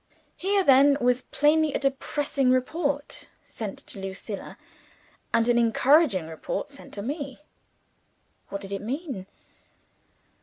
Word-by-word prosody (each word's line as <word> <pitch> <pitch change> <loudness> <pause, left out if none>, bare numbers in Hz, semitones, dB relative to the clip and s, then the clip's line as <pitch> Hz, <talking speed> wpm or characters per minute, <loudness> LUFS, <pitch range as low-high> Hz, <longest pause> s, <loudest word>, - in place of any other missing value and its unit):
Here 395 +1 +1
then 280 -1 +6
was 250 +1 +2
plainly 300 +2 +2
a - - +1
depressing 275 0 0
report 285 +3 -1 0.2
sent 210 -4 -6
to - - -9
Lucilla, 195 +2 -6 0.7
and 230 - +2
an 240 0 +4
encouraging 235 - +4
report 160 - -4
sent 280 - -13
to 200 - -5
me. 280 +1 -4 1.1
What 200 - -5
did 195 -1 -7
it 200 - -3
mean? 255 - -4
265 Hz, 120 wpm, -26 LUFS, 215-290 Hz, 1.1 s, then